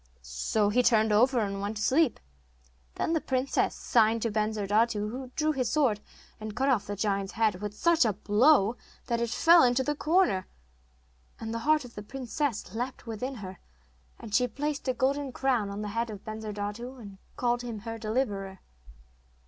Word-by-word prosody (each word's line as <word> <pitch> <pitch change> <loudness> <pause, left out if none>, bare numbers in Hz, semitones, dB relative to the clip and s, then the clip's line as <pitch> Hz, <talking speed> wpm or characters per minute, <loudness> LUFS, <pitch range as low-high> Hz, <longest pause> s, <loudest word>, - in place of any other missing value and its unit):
So 65 - 0
he 245 +4 +3
turned 220 -3 +3
over 240 +3 +4
and 200 -1 -3
went 205 +2 -3
to 210 - -2
sleep. 310 +7 +2 0.8
Then 325 - -1
the 320 - +1
princess 260 +1 0
signed 225 -1 +2
to 230 - 0
Bensurdatu, 215 0 0
who 260 +2 -6
drew 310 0 +1
his 255 -5 -1
sword 260 -9 +2 0.4
and 215 -1 -6
cut 270 +2 +1
off 245 -6 +1
the 205 - -3
giant's 200 -1 -1
head 215 -4 +1
with 210 0 -5
such 340 -2 +4
a 220 -3 +1
blow 215 +3 +3 0.3
that 235 -2 -1
it 235 - 0
flew 335 +8 +6
into 250 +1 +3
the 295 - 0
corner. 310 - +2 0.9
And 225 0 -5
the 230 - -2
heart 305 -3 +4
of 240 - -12
the 205 - -7
princess 255 - -3
leapt 245 +3 -4
within 245 +4 -4
her, 185 0 -9 0.6
and 215 - -9
she 250 +3 +3
placed 285 +4 -4
a 255 - +1
golden 275 +2 0
crown 245 -5 0
on 200 +1 -5
the 210 - -4
head 230 +2 -2
of 205 -3 -8
Bensurdatu, 215 +3 -5
and 200 -4 -11 0.2
called 240 -1 +1
him 235 -4 -6
her 225 0 -6
deliverer. 210 -4 -2
230 Hz, 180 wpm, -28 LUFS, 210-260 Hz, 0.9 s, flew